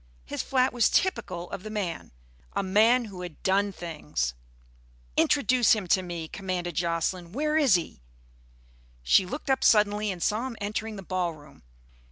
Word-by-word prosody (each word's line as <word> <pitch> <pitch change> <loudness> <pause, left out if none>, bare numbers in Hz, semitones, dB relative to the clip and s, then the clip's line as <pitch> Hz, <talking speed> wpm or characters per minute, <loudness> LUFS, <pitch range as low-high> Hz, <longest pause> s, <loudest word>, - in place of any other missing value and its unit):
His - - -3
flat 260 -1 +1
was 240 -2 +3
typical 200 - 0
of - - -5
the 215 - -7
man 200 -6 -4 0.4
a - - -1
man 220 +6 +4
who 195 -4 -9
had 175 -4 -9
done 200 +2 +2
things. 150 - -3 0.8
"Introduce 255 -4 +4
him 215 -4 -1
to 190 - +4
me," 170 -3 -5
commanded 180 -2 -4
Jocelyn. 170 +1 -1
"Where 300 +4 0
is 280 -10 +5
he?" 165 - -3 1.0
She 180 - +4
looked 280 +4 -3
up 265 - +1
suddenly 210 0 +4
and 180 -4 -3
saw 225 +5 0
him 235 -4 -8
entering 215 +2 -3
the 195 - -8
ballroom. 170 -5 -4
195 Hz, 160 wpm, -27 LUFS, 175-225 Hz, 1.0 s, is